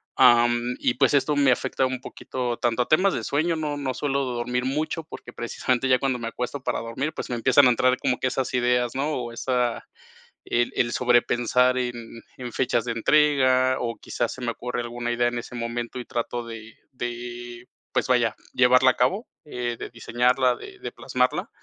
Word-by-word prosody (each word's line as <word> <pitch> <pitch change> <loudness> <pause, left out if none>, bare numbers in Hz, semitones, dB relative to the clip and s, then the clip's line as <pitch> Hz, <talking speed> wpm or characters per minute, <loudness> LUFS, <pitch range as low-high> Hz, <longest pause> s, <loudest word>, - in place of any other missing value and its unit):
am, 120 -1 +4
y 120 - +1
pues 125 - +2
esto 145 +1 +2
me 140 -2 +4
afecta 130 +1 0
un 130 -1 -4
poquito, 125 -3 -4
tanto 120 +1 +1
a - - -16
temas 185 +5 +3
de - - -3
sueño, 160 +4 +1
no 150 -2 -2
no 135 -2 -2
suelo 140 -1 -1
dormir 125 0 -2
mucho 155 +4 -2
porque 120 -5 -11
precisamente 125 +2 -1
ya 130 - +5
cuando 130 -1 -1
me 115 - -4
acuesto 125 +4 -4
para - - -1
dormir, 130 +7 -3
pues - - -5
me - - 0
empiezan 130 +3 +5
a - - +7
entrar 130 +2 +2
como 125 - 0
que 130 - 0
esas 130 0 -2
ideas, 125 -1 +1
¿no?, 140 +4 -1
o 120 -2 -4
esa 125 -1 -1 0.6
el 120 0 0
el 120 0 +1
sobrepensar 125 +1 +3
en 125 -1 -2 0.4
en 125 -2 -7
fechas 125 -3 0
de 120 - -2
entrega, 130 0 +3
o 115 -1 -3
quizás 120 - -3
se 130 - -10
me 120 - -1
ocurre 120 +1 -4
alguna 120 0 -4
idea 120 0 +2
en 120 0 -3
ese 120 - -8
momento 120 +1 -4
y 120 - -5
trato 120 0 -3
de 115 -1 -9 0.2
de, 120 0 -6 0.3
pues - - +1
vaya, 120 -3 +2 0.2
llevarla 125 +1 +5
a - - -2
cabo, 140 - +1 0.2
eh, 120 -4 -3
de - - -6
diseñarla, 125 +2 +1
de 390 -1 -11
de - - -6
plasmarla, - - -1
125 Hz, 195 wpm, -25 LUFS, 120-130 Hz, 0.6 s, a